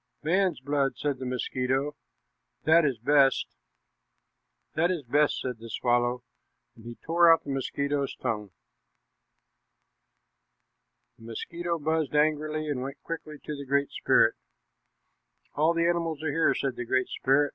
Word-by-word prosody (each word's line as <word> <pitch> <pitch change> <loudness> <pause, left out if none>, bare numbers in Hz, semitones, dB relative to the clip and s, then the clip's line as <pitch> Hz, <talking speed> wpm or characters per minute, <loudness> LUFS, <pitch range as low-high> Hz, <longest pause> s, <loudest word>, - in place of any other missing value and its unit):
"Man's 180 -1 +1
blood," 140 0 0
said 145 -3 -2
the 130 - -4
mosquito; 130 +3 -1 0.7
"that 160 +1 +5
is 135 -5 0
best." 135 +3 +3 1.3
"This 170 +3 +2
is 175 -5 -2
best," 145 +4 +2
said 125 -3 -4
the 115 +1 -10
swallow, 120 +1 0 0.5
and 115 - -16
he 120 0 -7
tore 170 +3 +4
out 165 - +4
the 140 - -5
mosquito's 140 +1 -2
tongue. 105 -5 -3 2.7
The 115 - -14
mosquito 170 +9 -4
buzzed 155 -1 -1
angrily 155 +1 +1
and 140 -4 -2
went 135 +2 -6
quickly 160 -2 -6
to 150 - -5
the 140 - -7
Great 140 +1 +1
Spirit. - - +3 1.2
"All 155 +3 +3
the 170 0 +2
animals 165 -3 -1
are 155 - 0
here," 165 +2 +2
said 135 -3 -2
the 120 - -4
Great 130 +2 +1
Spirit. 140 +2 +2
145 Hz, 140 wpm, -27 LUFS, 130-160 Hz, 2.7 s, that